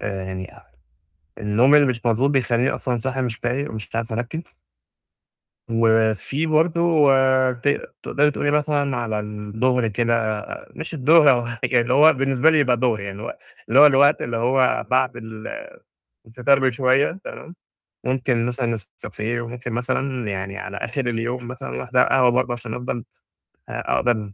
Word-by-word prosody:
يعني 95 -2 -5 0.9
النوم 115 +7 +3
اللي 145 -1 +6
مش 125 -3 -3
مضبوط 120 +4 +2
بيخليني 125 -2 +1
أصلًا 125 -3 -2
صاحي 130 +3 -3
مش 120 -3 -2
فايق 125 +6 -3
ومش 110 -1 -7
عارف 115 0 -3
أركِّز. 120 +8 -4 1.3
وفيه 115 +6 +1
برضو، 160 -1 +3 0.4
ت 125 +3 -3 0.3
تقدري 150 +1 +1
تقولي 145 0 -1
مثلًا 145 -2 0
على 110 -3 -2
الضُهر 110 +4 -1
كده، 110 -1 -1 0.3
مش 160 - -7
الضُهر، 150 +1 +5
هو 120 -2 +1 0.2
يعني 125 - +2
اللي 120 +1 -1
هو 150 +4 +7
بالنسبة 135 +1 +2
لي 160 - +3
يبقى 130 -4 +3
ضُهر، 120 -3 0
يعني 100 0 -7
اللي 115 - -6
هو - - -4 0.4
اللي 125 - +3
هو 150 - +10
الوقت 145 +1 +4
اللي 120 - -3
هو 125 +3 +1
بعد 130 -1 +1
ال 110 -2 -9 0.8
الفطار 125 +4 +2
بشوية، 130 +6 +1
تمام؟ 170 - -10 0.5
مُمكن 125 -2 0
مثلًا 125 0 -2
نسكافيه، 115 0 -5
وممكن 120 +1 -7
مثلًا 125 0 -2
يعني 100 +1 -5
على 100 -1 -7
آخر 115 +6 -4
اليوم 120 +1 -3
مثلًا 125 - -7
واحدة 125 - +2
قهوة 130 -2 +4
برضو 125 0 0
عشان 120 -2 -6
أفضّل 125 0 -4 0.7
أ - - -3
أقدر، 110 -4 0
125 Hz, 155 wpm, -22 LUFS, 115-135 Hz, 1.3 s, هو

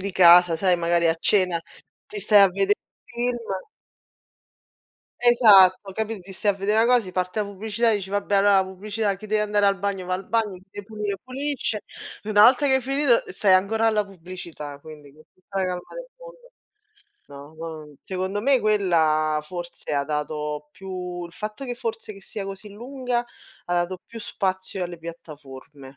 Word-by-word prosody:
di 200 +1 -3
casa, 175 -2 +7
sai, 180 +1 +2
magari 170 0 +1
a 165 - +3
cena 180 -1 +2 0.5
ti 210 - -7
stai 205 0 +5
a 195 - +7
vedè 195 +2 +1
un - - -72
film 240 +1 -2 1.9
Esatto, 205 -6 +6
capi 220 +2 -3
ti 195 +2 -11
stai 205 +2 +1
a - - -10
vede' 195 +2 -1
na 225 +1 +4
cos 245 -1 +4
ti 185 -3 -9
parte 180 +3 -1
la - - 0
pubblicità 215 +3 -1
e 215 - +2
dici: 195 -2 -6
"Vabbè 205 0 0
allora 200 +1 +4
la - - -6
pubblicità, 200 +2 -3
chi 215 - -11
deve 215 0 +1
andare 205 -1 +2
al 195 -1 +2
bagno, 195 -2 -3
va 185 - -1
al 185 +1 -6
bagno, 225 -4 0
chi 185 0 -14
deve 205 0 -9
pulire 210 -2 -4
pulisce", 255 -4 -3 0.4
una 210 0 +5
volta 255 +4 +5
che 265 - +3
hai - - 0
finito 270 -1 +2
stai 190 +1 +1
ancora 210 +5 +3
alla 210 -2 +1
pubblicità, 170 -6 -9
quindi 150 -2 -13
con 155 - -19
tutta 190 +1 -7
la 190 - +1
calma 180 -1 -2
del - - -8
mondo. - - -13 0.9
No, 140 +2 -12
no, 155 -2 -8
secondo 190 +2 -3
me 270 +2 +3
quella 160 -7 +2
forse 175 0 -7
ha 140 -1 +1
dato 150 0 -4
più 180 -1 -6
il 170 - -12
fatto 215 +5 -6
che 245 - -3
forse 225 -2 -5
che 195 - -14
sia 205 +1 -6
così 195 +2 -8
lunga 245 +2 -3 0.4
ha 175 - -2
dato 180 +1 -5
più 230 - -10
spazio 190 -2 -3
alle 175 -1 -6
piattaforme. 150 -4 -11
195 Hz, 185 wpm, -24 LUFS, 175-215 Hz, 1.9 s, casa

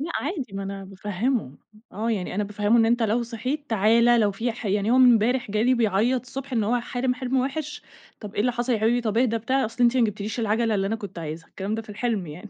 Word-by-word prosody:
لأ 320 +4 -4
عادي، 285 - -3
ما 195 0 -4
أنا 195 0 -6
بافهِّمه، 195 - -2 0.4
آه، 225 +4 -2
يعني 190 -5 -2
أنا 210 +2 0
بافهِّمه 205 +3 +1
إن 225 - +4
"أنت 235 0 +2
لو 225 +2 +1
صحيت، 250 +5 -4
تعال." 225 +2 +4
لو 235 -4 +4
في 225 +4 -2
ح 235 -1 -7
يعني 205 +2 +1
هو 250 - +4
إمبارح 245 -1 +4
جالي 225 +5 +2
بيعيّط 230 +3 +2
الصبح 270 +2 -8
إن 225 -4 +1
هو 240 +3 +1
حالم 250 +1 -1
حِلم 255 +1 -2
وِحش، 280 +3 -2 0.4
طب 210 -2 -9
"إيه - - -1
اللي 250 +3 +2
حصل 240 +2 -1
يا 225 - +1
حبيبي، 230 +3 +2
طب 225 -2 -1
إهدى." 235 -2 +2
بتاع، 260 +5 0
"أصل 230 +3 -3
أنتِ 240 +2 +3
ما 245 - +4
جبتيليش 210 +2 -3
العجلة 225 0 +1
اللي 195 -1 0
أنا 220 +3 -1
كنت 200 -5 -8
عايزها." 160 0 -6
الكلام 200 +3 -4
ده 225 - -3
في 220 - -21
الحِلم 210 -3 -2
يعني. 170 +8 -9
225 Hz, 245 wpm, -24 LUFS, 205-245 Hz, 0.4 s, إن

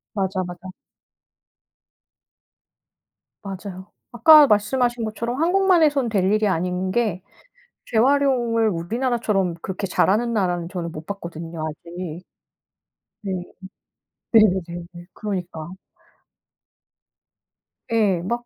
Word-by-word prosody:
맞아, 190 -1 -1
맞아. 180 +1 -9 2.7
맞아요. 190 -1 -8 0.2
아까 295 +5 +8
말씀하신 240 +2 +1
것처럼 235 +5 -3
한국만 370 0 +3
해선 280 -6 +2
될 200 -4 +1
일이 215 0 +2
아닌 180 +1 -1
게 210 -5 0 0.7
재활용을 240 -2 +2
우리나라처럼 210 0 -1
그렇게 190 +1 -4
잘하는 220 +5 +1
나라는 175 -5 -1
저는 170 -3 -5
못 155 +1 -9
봤거든요 170 -4 -7
아직. 170 +2 -7 1.0
네. 190 -2 -2 0.9
네네네네. 180 -6 +3 0.3
그러니까. 180 -6 -5 2.2
예. 205 -6 +2
막 235 +6 -3
200 Hz, 215 characters per minute, -22 LUFS, 180-235 Hz, 2.7 s, 아까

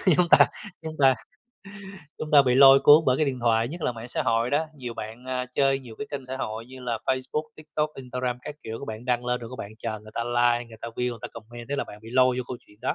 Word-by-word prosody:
chúng 180 -1 +3
ta - - +8 0.4
chúng 160 -1 -6
ta 135 -1 +6 1.1
chúng 155 - -5
ta 145 -2 +8
bị 125 -2 +2
lôi 135 0 +8
cuốn 150 +2 +8
bởi 130 0 +4
cái 155 - +2
điện 130 -2 -2
thoại, 115 0 +2
nhất 165 +2 -7
là 125 - 0
mạng 115 +1 -9
xã - - +2
hội 115 0 +1
đó, 155 +3 +1
nhiều 120 -3 -6
bạn, 110 +3 -8
a, 130 -1 -3
chơi 135 +1 +1
nhiều 120 -4 -11
cái 145 - -4
kênh 140 -2 -5
xã 130 +1 -5
hội 110 -2 -5
như 130 0 -11
là 120 -3 -2
Facebook, 130 +3 -1
TikTok, 155 0 -3
Instagram 125 -1 -3
các 150 - -7
kiểu, 110 +1 -6
các - - -7
bạn 110 +2 -6
đăng 125 -1 0
lên 125 0 -1
rồi 115 +1 -8
các 130 - -9
bạn 100 - -6
chờ 110 -2 -4
người 110 0 -14
ta 115 - -1
like, 120 0 +2
người 110 - -12
ta 115 - -5
view, 125 +2 -2
người 115 - -7
ta - - -5
comment 120 +2 -11
thế 140 - -2
là 140 - -1
bạn 105 - -11
bị 115 - -11
lôi 130 -1 +4
vô - - -1
câu 125 - -5
chuyện 105 - -19
đó. - - -1
125 Hz, 285 wpm, -26 LUFS, 115-135 Hz, 1.1 s, ta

